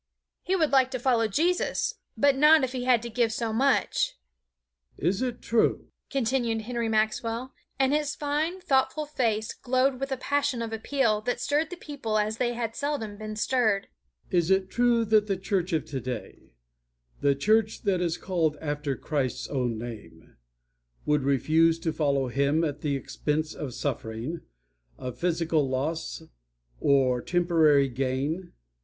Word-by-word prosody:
He 375 Hz, -, 0 dB
would 320 Hz, -5 st, +2 dB
like 265 Hz, -2 st, +4 dB
to 255 Hz, -1 st, -4 dB
follow 235 Hz, -3 st, +2 dB
Jesus, 335 Hz, -, 0 dB, 0.2 s
but 280 Hz, -1 st, +4 dB
not 300 Hz, +2 st, +6 dB
if 255 Hz, -, 0 dB
he 250 Hz, -1 st, -4 dB
had 245 Hz, -3 st, +4 dB
to 235 Hz, -, -5 dB
give 230 Hz, 0 st, +1 dB
so 225 Hz, 0 st, -2 dB
much. 265 Hz, +4 st, +1 dB, 0.8 s
"Is 185 Hz, -, 0 dB
it 250 Hz, -2 st, -3 dB
true," 230 Hz, -1 st, +1 dB, 0.2 s
continued 235 Hz, -3 st, 0 dB
Henry 235 Hz, 0 st, -2 dB
Maxwell, 225 Hz, +3 st, -1 dB, 0.2 s
and 270 Hz, +1 st, +2 dB
his 295 Hz, -1 st, 0 dB
fine, 305 Hz, +5 st, -1 dB
thoughtful 300 Hz, -1 st, +1 dB
face 225 Hz, -7 st, -1 dB
glowed 255 Hz, +1 st, +1 dB
with 275 Hz, 0 st, -3 dB
a 265 Hz, -, 0 dB
passion 285 Hz, -2 st, 0 dB
of 225 Hz, -1 st, -5 dB
appeal 225 Hz, -1 st, +1 dB
that 245 Hz, +3 st, -2 dB
stirred 290 Hz, +5 st, 0 dB
the 360 Hz, -, -6 dB
people 280 Hz, -10 st, -3 dB
as 215 Hz, +1 st, 0 dB
they 240 Hz, 0 st, 0 dB
had 230 Hz, -1 st, -3 dB
seldom 280 Hz, -8 st, -3 dB
been 215 Hz, 0 st, -6 dB
stirred, 220 Hz, -3 st, +1 dB, 0.4 s
"is 175 Hz, -2 st, +2 dB
it 190 Hz, -1 st, +2 dB
true 240 Hz, -1 st, +3 dB
that 215 Hz, -1 st, +3 dB
the 195 Hz, -2 st, 0 dB
church 190 Hz, -1 st, -1 dB
of 160 Hz, -3 st, 0 dB
today, 130 Hz, -4 st, -6 dB, 0.7 s
the 140 Hz, -1 st, +3 dB
church 215 Hz, +8 st, +1 dB
that 195 Hz, -4 st, +1 dB
is 170 Hz, -1 st, 0 dB
called 165 Hz, -5 st, 0 dB
after 145 Hz, -2 st, -2 dB
Christ's 130 Hz, -5 st, -2 dB
own 125 Hz, -5 st, -1 dB
name, 115 Hz, -1 st, -9 dB, 0.7 s
would 150 Hz, 0 st, +2 dB
refuse 155 Hz, +5 st, +3 dB
to 165 Hz, -1 st, -2 dB
follow 140 Hz, -3 st, +1 dB
Him 140 Hz, +5 st, +1 dB
at 145 Hz, -2 st, -2 dB
the 145 Hz, -2 st, 0 dB
expense 150 Hz, +3 st, -2 dB
of 130 Hz, -5 st, -6 dB
suffering, 125 Hz, +3 st, -4 dB, 0.6 s
of 125 Hz, -1 st, -7 dB
physical 165 Hz, -4 st, +1 dB
loss, 155 Hz, +5 st, -3 dB, 0.6 s
of 130 Hz, -3 st, +3 dB
temporary 160 Hz, -5 st, +4 dB
gain? 135 Hz, +7 st, -2 dB
215 Hz, 155 wpm, -27 LUFS, 150-255 Hz, 0.8 s, not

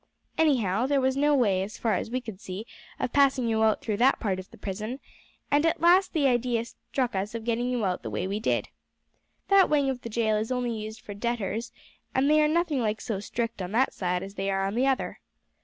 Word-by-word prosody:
Anyhow, 245 Hz, -8 st, +2 dB
there 280 Hz, 0 st, +2 dB
was 260 Hz, 0 st, +1 dB
no 290 Hz, +1 st, +3 dB
way, 200 Hz, -8 st, +2 dB
as 200 Hz, +2 st, -5 dB
far 225 Hz, -2 st, 0 dB
as -, -, -2 dB
we 255 Hz, +2 st, -2 dB
could 220 Hz, -5 st, -9 dB
see, 190 Hz, +4 st, -6 dB, 0.3 s
of -, -, -2 dB
passing 275 Hz, -3 st, +3 dB
you 220 Hz, -1 st, +1 dB
out 220 Hz, -1 st, +3 dB
through 215 Hz, -3 st, -2 dB
that 255 Hz, +4 st, +4 dB
part 195 Hz, -5 st, -1 dB
of 185 Hz, -, -9 dB
the -, -, -15 dB
prison, 215 Hz, +6 st, -5 dB, 0.5 s
and 290 Hz, +1 st, +4 dB
at 330 Hz, -1 st, +1 dB
last 360 Hz, +4 st, +4 dB
the 305 Hz, -4 st, +2 dB
idea 240 Hz, -2 st, +1 dB
struck 250 Hz, +1 st, -3 dB
us 200 Hz, +4 st, -3 dB
of 230 Hz, -, -4 dB
getting 240 Hz, +1 st, 0 dB
you 245 Hz, -4 st, 0 dB
out 180 Hz, -1 st, -1 dB
the -, -, -5 dB
way -, -, -2 dB
we 200 Hz, +2 st, -2 dB
did. 220 Hz, -, 0 dB, 0.8 s
That 395 Hz, -1 st, +6 dB
wing 285 Hz, -3 st, +2 dB
of 250 Hz, -2 st, -6 dB
the 230 Hz, -, -6 dB
jail 220 Hz, -1 st, +1 dB
is 220 Hz, +3 st, -2 dB
only 250 Hz, -1 st, 0 dB
used 220 Hz, 0 st, -7 dB
for 215 Hz, -3 st, -8 dB
debtors, 225 Hz, 0 st, -2 dB, 0.4 s
and 270 Hz, +3 st, +3 dB
they 305 Hz, 0 st, +5 dB
are 300 Hz, -, +4 dB
nothing 320 Hz, -2 st, +1 dB
like 215 Hz, -1 st, -1 dB
so 215 Hz, -4 st, -3 dB
strict 230 Hz, +1 st, -3 dB
on 180 Hz, +2 st, -5 dB
that 260 Hz, +4 st, +2 dB
side 180 Hz, -1 st, -1 dB
as 195 Hz, 0 st, -8 dB
they 195 Hz, 0 st, -2 dB
are 195 Hz, 0 st, 0 dB
on 195 Hz, -, -2 dB
the 250 Hz, +4 st, +2 dB
other. 265 Hz, -1 st, -1 dB
230 Hz, 240 wpm, -27 LUFS, 210-265 Hz, 0.8 s, That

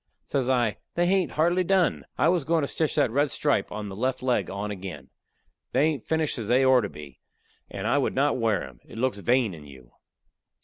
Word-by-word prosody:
Says 130 Hz, -2 st, -1 dB
I: 120 Hz, -5 st, +1 dB, 0.2 s
"They 175 Hz, -, +2 dB
hain't 185 Hz, 0 st, +1 dB
hardly 175 Hz, +4 st, +2 dB
done. 185 Hz, -1 st, +1 dB
I -, -, +3 dB
was 175 Hz, -3 st, +2 dB
goin' 160 Hz, +2 st, +1 dB
to -, -, 0 dB
stitch 155 Hz, +1 st, -1 dB
that 145 Hz, -6 st, +2 dB
red 145 Hz, +4 st, +2 dB
stripe 145 Hz, -10 st, 0 dB
on 105 Hz, 0 st, -5 dB
the 95 Hz, -, -7 dB
left 130 Hz, +4 st, -2 dB
leg 125 Hz, -1 st, +1 dB
on 100 Hz, +2 st, -4 dB
again. 95 Hz, -6 st, -8 dB, 0.6 s
They -, -, +3 dB
ain't 150 Hz, -6 st, 0 dB
finished 160 Hz, -4 st, 0 dB
as 110 Hz, -, -5 dB
they 125 Hz, +3 st, +4 dB
ort 130 Hz, -4 st, +5 dB
to -, -, -5 dB
be, 70 Hz, -6 st, -12 dB, 0.5 s
and -, -, -6 dB
I -, -, +2 dB
would -, -, -1 dB
not 140 Hz, 0 st, +2 dB
wear 110 Hz, -5 st, +1 dB
'em. 65 Hz, -2 st, -16 dB
It -, -, -13 dB
looks 125 Hz, -3 st, 0 dB
vain 120 Hz, -1 st, +2 dB
in 75 Hz, -3 st, -11 dB
you." 65 Hz, -3 st, -15 dB
130 Hz, 220 wpm, -26 LUFS, 100-150 Hz, 0.6 s, ort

